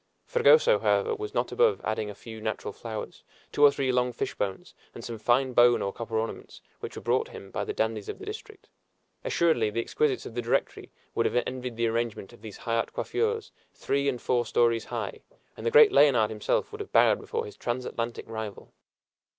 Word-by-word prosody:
Fragoso, 485 +1 +5
however, 460 - +2
was 425 +1 -6
not - - 0
above 470 -2 +3
adding 110 -1 -2
a 105 - -8
few 110 +1 -10
natural 110 -2 -3
flowers, 110 0 -7 0.3
two 145 - +1
or 145 - +10
three 135 -2 -1
long 125 0 +1
fish 120 - -3
bones, 95 -2 -4 0.2
and - - -8
some 115 -2 -6
fine 125 +4 +2
bone 120 0 +5
or 100 - -2
copper 115 -1 -4
ornaments, 110 +1 -5 0.2
which - - -7
were - - -8
brought - - +1
him 100 - -11
by - - -2
the - - -3
dandies 110 -2 -2
of - - -5
the - - -10
district. 430 -1 -9 0.6
Assuredly, 160 -11 +2
the 105 - -3
exquisites 135 +4 0
of - - -8
the 120 - -2
Directory 115 - -1 0.2
would - - +1
have 125 - +1
envied 125 -2 -5
the 115 +1 0
arrangement 115 -2 -2
of 120 - -17
these 110 -3 -9
high 115 0 -2
art 115 - -1
coiffures, 450 -1 -1 0.2
three 140 0 0
and 125 -3 -3
four 120 0 +1
stories 115 0 +2
high, - - -5 0.3
and - - -5
the - - +1
great 455 -2 +8
Leonard 120 - +5
himself 105 - -1
would 430 0 -7
have 415 - -8
bowed - - +5
before 460 0 -3
his 425 - -10
transatlantic 120 -1 -4
rival. 110 -3 -7
120 Hz, 205 wpm, -27 LUFS, 110-170 Hz, 0.6 s, or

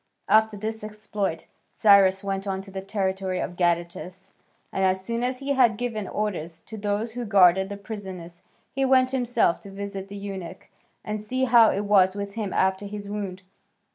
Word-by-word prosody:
After 220 -1 +4
this 220 +1 -5
exploit 210 -4 -4 0.2
Cyrus 195 -2 +5
went 195 0 -3
on 190 -1 -2
to 195 - -12
the 190 0 -5
territory 190 -2 -2
of 175 - -4
Gadatas, 175 +2 -2 0.4
and 190 - 0
as 190 0 +1
soon 235 +2 -2
as 255 +1 -1
he 275 +1 -2
had 240 -5 +4
given 220 -4 -3
orders 175 -6 -3
to 220 - -10
those 210 +2 -2
who 245 +2 -5
guarded 190 -3 +5
the 200 - -5
prisoners, 190 -5 -8 0.3
he 270 - -1
went 260 -1 +4
himself 245 -8 +2
to 200 - -11
visit 195 0 -6
the 200 +1 -8
eunuch 190 -3 -7 0.4
and 210 0 -3
see 255 +5 -2
how 235 -3 +6
it 200 +2 -1
was 190 -2 +4
with 200 0 -5
him 210 -3 -3
after 190 +1 +1
his 205 0 -7
wound. 200 -2 -5
200 Hz, 180 wpm, -25 LUFS, 190-220 Hz, 0.4 s, how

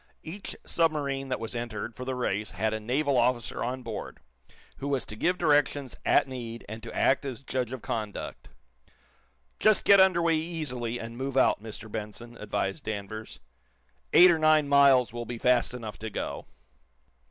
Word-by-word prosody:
Each 190 +5 -7
submarine 145 -5 0
that 130 - -1
was 115 +2 -5
entered 115 -1 -4
for 125 - -7
the 130 0 -2
race 105 -4 -1
had 110 0 -1
a 110 - -2
naval 135 +5 0
officer 120 -1 0
on 125 +1 -3
board, 115 -2 -6 0.6
who 140 - -5
was 135 -4 -1
to 105 - -8
give 180 +11 +1
directions, 145 -4 +2
at - - +4
need, 120 -3 -7
and 110 +1 -7
to - - -8
act 135 - +2
as 135 -1 -6
judge 125 -3 -2
of 130 -3 -6
conduct. 105 -3 -5 1.1
"Just 215 -1 +4
get 200 -1 +7
under 190 -2 +5
way 165 -1 +3
easily, 140 -8 -4
and 115 +1 -7
move 135 0 -3
out, 130 - +4
Mr. 110 0 -8
Benson," 110 +3 -7
advised 100 -2 -3
Danvers. 110 -2 -6 0.7
"Eight 180 +1 +8
or 165 - +1
nine 155 -1 +4
miles 140 -4 +5
will 120 0 -4
be 120 - -5
fast 125 0 +2
enough 110 -5 -7
to 110 - -5
go." 100 - -5
125 Hz, 175 wpm, -28 LUFS, 115-140 Hz, 1.1 s, Eight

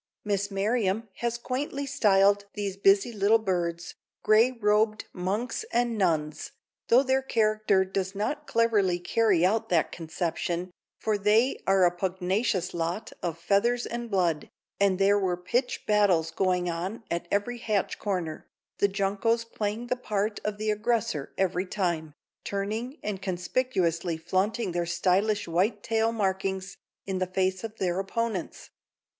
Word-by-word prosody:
Miss 200 -1 0
Merriam 210 +1 0
has 235 0 -1
quaintly 275 +3 -3
styled 200 -5 +3
these 200 -2 -3
busy 195 +4 +3
little 210 +2 +4
birds: 175 -4 -2 0.3
"Gray 220 +3 +5
robed 215 -2 +1
monks 200 - -2
and 240 -1 +1
nuns," 155 -6 -1 0.3
though 250 +3 +6
their 265 0 +2
character 215 -5 +2
does 190 0 -3
not 290 +9 -2
cleverly 210 -6 +2
carry 180 0 +2
out 215 +4 +1
that 170 -3 +2
conception, 170 +1 -3 0.3
for 215 -2 0
they 215 +6 +3
are 190 -1 +5
a 175 - +4
pugnacious 190 +2 -1
lot 175 +6 -3
of 165 -2 -3
feathers 220 +7 +1
and 235 0 -5
blood, 175 -6 0 0.3
and 200 -2 +3
there 200 +1 +4
were 185 -3 0
pitch 245 +8 -1
battles 190 -6 +3
going 180 0 +1
on 180 +7 -4
at 170 0 -2
every 235 +4 -1
hatch 210 -4 -1
corner, 180 -6 -3 0.3
the 200 - +4
juncos 200 +4 0
playing 220 0 -3
the 250 - 0
part 210 -3 -2
of 210 -1 -2
the 215 0 0
aggressor 215 - -1
every 185 0 0
time, 170 -6 -2 0.3
turning 215 +7 -3
and 200 -2 -3
conspicuously 180 -3 -1
flaunting 190 +5 -1
their 175 0 -1
stylish 195 +5 +1
white 180 +7 0
tail 225 0 +1
markings 190 -3 -2 0.3
in 190 -1 -2
the 185 - 0
face 185 +1 0
of 220 -1 -6
their 180 -1 0
opponents. 200 -1 -3
200 Hz, 145 wpm, -27 LUFS, 180-225 Hz, 0.3 s, though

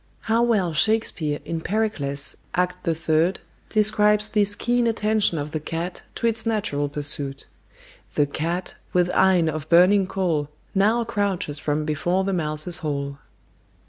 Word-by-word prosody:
How 225 +1 +1
well 210 -8 +2
Shakespeare 160 -5 +1
in 165 -1 -3
Pericles, 160 -10 -2 0.2
Act 180 0 -1
iii., 165 +2 +2 0.4
describes 210 0 +3
this 205 -1 +2
keen 240 +1 +1
attention 215 -5 +1
of 145 0 -4
the 155 - -2
cat 165 +3 -5
to - - -3
its 225 -1 +2
natural 205 -11 -1
pursuit! 145 -1 -4 0.7
The 145 - +3
cat, 165 +5 -3 0.2
with 180 0 +2
eyne 185 -3 +4
of 155 -1 -4
burning 185 +3 +5
coal, 170 -6 -1 0.2
Now 215 +4 +3
crouches 200 -9 -1
from 150 0 -1
(before) 175 +5 0
the 195 0 -1
mouse's 155 +1 +1
hole. 140 -2 -3
180 Hz, 140 wpm, -23 LUFS, 155-210 Hz, 0.7 s, burning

